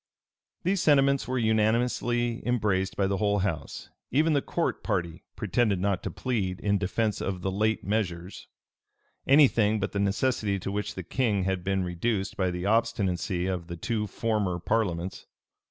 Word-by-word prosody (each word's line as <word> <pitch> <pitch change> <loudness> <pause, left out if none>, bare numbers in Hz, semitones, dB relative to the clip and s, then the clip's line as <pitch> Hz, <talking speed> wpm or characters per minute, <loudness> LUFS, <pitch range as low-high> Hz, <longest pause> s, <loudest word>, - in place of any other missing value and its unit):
[*] - - -55
These 185 +1 +1
sentiments 140 -2 +3
were 130 +1 -1
unanimously 120 +1 +1
embraced 100 -6 0
by 100 - +2
the 100 0 0
whole 105 0 +1
house. 85 -6 -4 0.2
Even 155 +4 +3
the 140 - +2
court 170 - -2
party 85 -6 -2
pretended 105 -1 +1
not 100 -1 0
to - - -4
plead, 100 -8 -2
in 100 -1 +1
defence 105 +3 -1
of 95 -2 -3
the 95 - 0
late 110 +3 0
measures, 95 -3 -3 0.8
any 140 +1 +8
thing 110 -3 +1
but 100 - -2
the 100 - -2
necessity 100 0 +1
to 95 +1 -4
which 105 +1 -3
the 95 - -5
king 105 0 0
had 95 -1 -1
been 95 0 0
reduced 95 +3 -2
by 95 -2 0
the 90 +1 -4
obstinacy 100 -5 0
of 90 -3 -3
the 85 -1 -6
two 105 +5 -2
former 105 -3 -1
parliaments. 90 -2 -2
100 Hz, 170 wpm, -27 LUFS, 95-115 Hz, 0.8 s, any